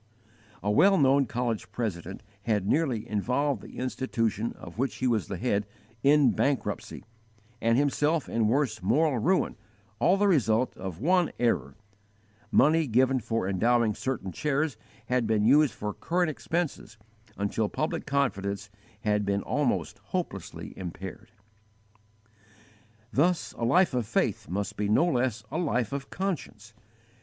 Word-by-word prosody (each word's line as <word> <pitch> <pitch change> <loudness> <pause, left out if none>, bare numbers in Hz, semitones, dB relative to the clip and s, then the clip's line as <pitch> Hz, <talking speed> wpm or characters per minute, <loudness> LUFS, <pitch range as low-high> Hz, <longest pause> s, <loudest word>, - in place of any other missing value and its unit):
A 105 - +1
well 195 - +5
known 135 -1 +4
college 120 -2 -2
president 95 -6 -4 0.2
had 105 -4 +1
nearly 125 -3 0
involved 125 +4 0
the - - -12
institution 115 -3 -1
of 85 +5 -11
which 135 +1 0
he 130 - -3
was 115 -5 +1
the 95 - -4
head, 105 -2 0 0.3
in 145 +1 +5
bankruptcy, 130 -7 -2 0.6
and 115 +1 +3
himself 145 +2 +1
in 115 -2 +1
worse 120 -3 +1
moral 135 - +2
ruin, 185 - +1 0.4
all 185 +3 +4
the 205 +1 +3
result 125 - +2
of 95 -3 -6
one 175 - +2
error 70 - 0 0.7
money 160 +1 +4
given 130 +3 +3
for 115 -4 -2
endowing 115 +3 +2
certain 110 -6 -3
chairs 150 - -1 0.3
had 125 -1 0
been 110 -1 +2
used 140 -1 +5
for 105 0 -4
current 175 -1 0
expenses 155 -9 -3 0.4
until 100 +1 -1
public 155 - -3
confidence 100 -8 -1 0.3
had 105 -1 +1
been 100 0 0
almost - - -1
hopelessly - - -5
impaired. 95 +4 -7 1.8
Thus 170 +4 +2
a - - -7
life 175 +7 +4
of 120 -4 -1
faith - - -1
must 100 +3 -3
be 105 -1 -1
no 110 +11 +4
less 125 -8 0
a 160 - -1
life 125 - 0
of 140 0 -4
_conscience. 130 - -4
120 Hz, 140 wpm, -28 LUFS, 105-145 Hz, 1.8 s, well